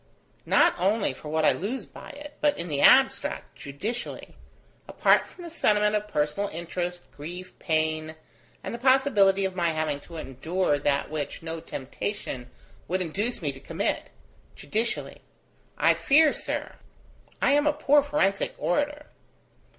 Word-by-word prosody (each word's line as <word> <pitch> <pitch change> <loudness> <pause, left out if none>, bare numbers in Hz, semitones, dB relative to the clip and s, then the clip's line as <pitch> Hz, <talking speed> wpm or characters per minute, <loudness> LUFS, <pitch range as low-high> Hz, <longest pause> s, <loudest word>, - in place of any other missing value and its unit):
Not - - +5
only 195 -3 +1
for 150 - -10
what 160 0 +1
I - - +6
lose 235 +8 -3
by - - -12
it, 290 0 -10
but 295 -1 +3
in 170 0 -5
the 145 -2 -1
abstract, - - +4
judicially 205 - -5 0.5
apart - - +3
from 360 - -13
the 340 - -7
sentiment 210 -8 +2
of 210 0 -1
personal 175 +3 -1
interest, 175 +2 -4
grief, 175 +5 -8
pain, 155 -1 -1 0.5
and - - -5
the 235 - -5
possibility 235 -7 +4
of 190 -1 -3
my 170 -2 +1
having 155 -2 -1
to 165 +3 -11
endure 160 +3 -1
that 140 0 0
which 155 +1 -4
no 165 0 -4
temptation 135 -3 -5 0.4
would 185 +1 0
induce 200 +6 -3
me 145 - 0
to 135 - -12
commit: 165 +7 -2 0.5
judicially; 225 +2 -3 0.6
I - - +5
fear, 305 +1 +4
sir, - - -4 0.6
I - - +3
am 290 +1 +3
a - - +5
poor 295 -1 +4
forensic 285 -9 0
orator 295 +10 -1
185 Hz, 150 wpm, -26 LUFS, 155-240 Hz, 0.6 s, I